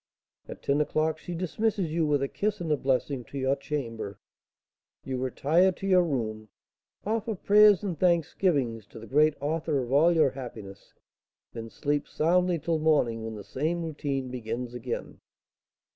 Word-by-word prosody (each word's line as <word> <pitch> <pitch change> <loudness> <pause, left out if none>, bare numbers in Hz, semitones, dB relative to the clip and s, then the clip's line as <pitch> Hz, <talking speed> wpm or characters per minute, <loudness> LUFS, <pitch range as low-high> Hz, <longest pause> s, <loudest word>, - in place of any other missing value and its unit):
At - - -10
ten 140 +2 +2
o'clock 155 +1 0
she 175 - -6
dismisses 185 +1 -1
you, 160 -1 +1
with 145 -2 +2
a - - 0
kiss 210 +7 -2
and 165 -3 -3
a - - +4
blessing, 135 -1 -1
to 140 - -8
your 135 0 +1
chamber; 115 -8 -5 0.9
you 130 -1 -3
retire 155 +8 +2
to 195 - -8
your 185 -2 +5
room, 110 -9 -3 0.6
offer 220 +1 -1
prayers 205 +1 +5
and 180 -7 -3
thanksgivings 150 - +1
to - - -13
the 110 - -10
Great 150 +4 +3
Author 155 +1 -1
of 125 -2 -3
all 160 +5 +5
your 155 -5 +3
happiness, 110 -7 -10 0.6
then 115 -1 -7
sleep 145 +4 -2
soundly 180 +2 +2
till 165 0 -1
morning, 135 -8 +2
when 110 0 -5
the 105 - -8
same 160 - -2
routine 140 -4 -3
begins 120 0 -4
again." 125 0 -5
145 Hz, 160 wpm, -28 LUFS, 125-170 Hz, 0.9 s, your